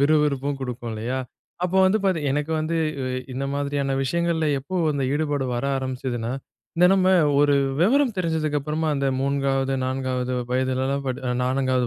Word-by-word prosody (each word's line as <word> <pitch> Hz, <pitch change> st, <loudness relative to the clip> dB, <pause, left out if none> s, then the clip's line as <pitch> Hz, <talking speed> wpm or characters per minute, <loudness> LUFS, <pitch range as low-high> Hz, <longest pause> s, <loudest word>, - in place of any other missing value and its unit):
விறு 155 Hz, +2 st, +4 dB
விறுப்பும் 140 Hz, -1 st, -1 dB
குடுக்கும் 125 Hz, -2 st, -5 dB
இல்லையா? 115 Hz, +4 st, -3 dB, 0.5 s
அப்போ 180 Hz, +1 st, 0 dB
வந்து 190 Hz, +3 st, +3 dB
பாத்தீங் 170 Hz, -6 st, +1 dB
எனக்கு 150 Hz, +3 st, -1 dB
வந்து 160 Hz, +2 st, -1 dB, 0.3 s
இ 130 Hz, 0 st, -2 dB
இந்த 135 Hz, +2 st, -3 dB
மாதிரியான 140 Hz, -1 st, -1 dB
விஷயங்கள்ல 170 Hz, +2 st, 0 dB
எப்போ 140 Hz, +8 st, -8 dB, 0.2 s
அந்த 140 Hz, -2 st, -1 dB
ஈடுபாடு 145 Hz, -2 st, 0 dB
வர 120 Hz, +3 st, -2 dB
ஆரம்பிச்சதுன்னா, 125 Hz, -3 st, -3 dB, 0.4 s
இந்த 175 Hz, +1 st, +6 dB
நம்ம 190 Hz, -1 st, +3 dB, 0.3 s
ஒரு 145 Hz, -1 st, +4 dB, 0.3 s
வெவரம் 250 Hz, +5 st, +3 dB
தெரிஞ்சதுக்கு 160 Hz, -4 st, 0 dB
அப்புறமா 155 Hz, +3 st, -2 dB
அந்த 140 Hz, 0 st, 0 dB
3வது, 135 Hz, -1 st, 0 dB
4வது 130 Hz, -1 st, -2 dB, 0.2 s
வயதிலலாம், 130 Hz, +2 st, 0 dB
படி 130 Hz, +1 st, -2 dB, 0.2 s
4வது 130 Hz, -1 st, +1 dB
140 Hz, 150 wpm, -24 LUFS, 130-155 Hz, 0.5 s, இந்த